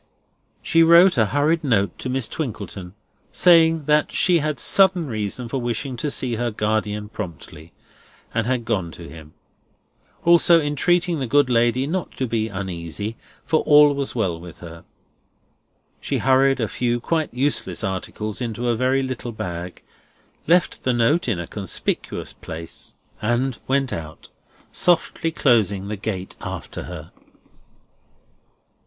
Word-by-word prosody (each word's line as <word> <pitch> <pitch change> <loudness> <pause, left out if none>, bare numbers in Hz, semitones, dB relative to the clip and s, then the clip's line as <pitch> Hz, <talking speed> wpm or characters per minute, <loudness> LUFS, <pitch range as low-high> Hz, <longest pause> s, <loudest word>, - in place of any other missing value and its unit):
She 165 - +3
wrote 170 +2 +7
a 110 -4 +3
hurried 150 - +1
note 105 -8 0
to 130 - -4
Miss 130 -1 0
Twinkleton, 100 - -6 0.4
saying 165 -3 +4
that 150 0 +2
she 180 -3 +3
had 150 -3 -2
sudden 190 +3 +4
reason 110 0 -4
for 130 +3 -3
wishing 125 +2 -3
to 150 - -2
see 125 -4 -1
her 120 +1 -1
guardian 105 -1 -2
promptly, 85 -6 -9 0.6
and 115 -1 0
had 125 -2 -1
gone 95 -7 -1
to 85 - -10
him; 80 0 -13 0.9
also, 170 0 +6
entreating 165 +3 +1
the 130 - -2
good 140 +1 +3
lady 120 +2 +2
not 175 +3 -3
to 130 - -2
be 110 -2 -1
uneasy, 95 +2 -4 0.3
for 160 - +2
all 150 -1 +6
was 140 -2 -3
well 95 -8 -1
with 85 -1 -11
her. 85 -1 -11 1.1
She - - -2
hurried 135 0 +3
a 110 - 0
few 120 +1 -1
quite 160 +5 -1
useless 125 -8 -1
articles 100 +3 -4
into 120 0 -2
a 120 - +2
very 130 +3 +1
little 130 -2 -5
bag, 90 -4 -6 0.6
left 175 +1 +2
the 130 - 0
note 125 +8 +2
in 110 -8 0
a 85 - -4
conspicuous - - -3
place, 80 +1 -8 0.3
and 120 +3 0
went 135 -1 0
out, 80 -1 -8 0.4
softly 170 -1 +1
closing 105 - +1
the 105 - -3
gate 95 -2 -5
after - - -6
her. - - -9
120 Hz, 145 wpm, -22 LUFS, 105-145 Hz, 1.1 s, wrote